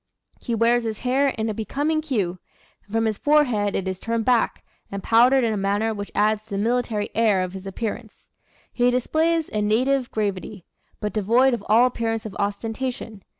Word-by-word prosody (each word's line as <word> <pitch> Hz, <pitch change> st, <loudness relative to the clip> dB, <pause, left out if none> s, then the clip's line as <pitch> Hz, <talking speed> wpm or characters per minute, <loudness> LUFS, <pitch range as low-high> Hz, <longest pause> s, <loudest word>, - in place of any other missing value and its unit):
He 235 Hz, -, -2 dB
wears 235 Hz, +2 st, +3 dB
his 220 Hz, -2 st, -5 dB
hair 260 Hz, +3 st, +2 dB
in 225 Hz, -4 st, -2 dB
a 215 Hz, -, -1 dB
becoming 290 Hz, +9 st, -1 dB
cue, 205 Hz, -, -2 dB, 0.4 s
and 200 Hz, -, -22 dB
from 225 Hz, +1 st, +1 dB
his 215 Hz, -2 st, -1 dB
forehead 245 Hz, -10 st, +2 dB
it 190 Hz, -, -2 dB
is 185 Hz, -1 st, -3 dB
turned 230 Hz, -1 st, -2 dB
back, 245 Hz, -3 st, +1 dB, 0.3 s
and 200 Hz, -1 st, -5 dB
powdered 245 Hz, +3 st, +5 dB
in 225 Hz, -2 st, +1 dB
a -, -, -2 dB
manner 205 Hz, +3 st, 0 dB
which 205 Hz, -1 st, -6 dB
adds 215 Hz, 0 st, +2 dB
to -, -, -28 dB
the 200 Hz, -, -3 dB
military 225 Hz, -1 st, -1 dB
air 210 Hz, -4 st, +2 dB
of 180 Hz, 0 st, -5 dB
his 190 Hz, 0 st, -8 dB
appearance. 220 Hz, +2 st, -6 dB, 0.5 s
He 245 Hz, 0 st, +3 dB
displays 315 Hz, +6 st, +1 dB
a 210 Hz, -, 0 dB
native 250 Hz, +5 st, +1 dB
gravity, 200 Hz, -2 st, -3 dB, 0.3 s
but 210 Hz, -1 st, -3 dB
devoid 235 Hz, +5 st, +3 dB
of 240 Hz, -, -3 dB
all 230 Hz, +3 st, +6 dB
appearance 225 Hz, -3 st, -2 dB
of 210 Hz, -, -7 dB
ostentation. 220 Hz, +1 st, -3 dB
225 Hz, 190 wpm, -23 LUFS, 205-245 Hz, 0.5 s, all